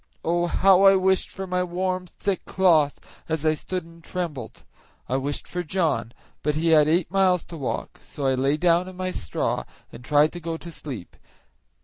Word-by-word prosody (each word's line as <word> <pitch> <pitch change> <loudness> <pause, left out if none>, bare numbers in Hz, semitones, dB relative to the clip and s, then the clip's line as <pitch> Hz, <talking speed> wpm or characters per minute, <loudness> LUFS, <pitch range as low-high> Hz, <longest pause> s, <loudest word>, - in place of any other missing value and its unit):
Oh! 175 +1 +1
how 190 +2 +5
I 195 0 +7
wished 190 0 +2
for 190 - -6
my 180 0 0
warm, 185 +1 -2
thick 195 +2 -3
cloth, 165 -6 +3 0.3
as 160 -1 -1
I 155 - +4
stood 180 +4 -4
and 165 0 -16
trembled. 155 -11 -5 0.4
I 130 - 0
wished 140 +2 -3
for 180 - -3
John, 155 - -1 0.3
but 150 0 0
he 165 +2 +1
had 155 -2 +6
eight 165 +1 +1
miles 185 -3 +3
to 170 - -9
walk, 135 -4 -4
so 140 - -6
I 135 - +3
lay 135 +3 +1
down 175 +2 +3
in 185 -1 -10
my 185 0 -2
straw 80 - -2 0.3
and 125 - -11
tried 150 +3 +4
to 175 - -7
go 165 -1 -4
to 170 +1 -10
sleep. 130 - -8
170 Hz, 195 wpm, -24 LUFS, 150-185 Hz, 0.4 s, I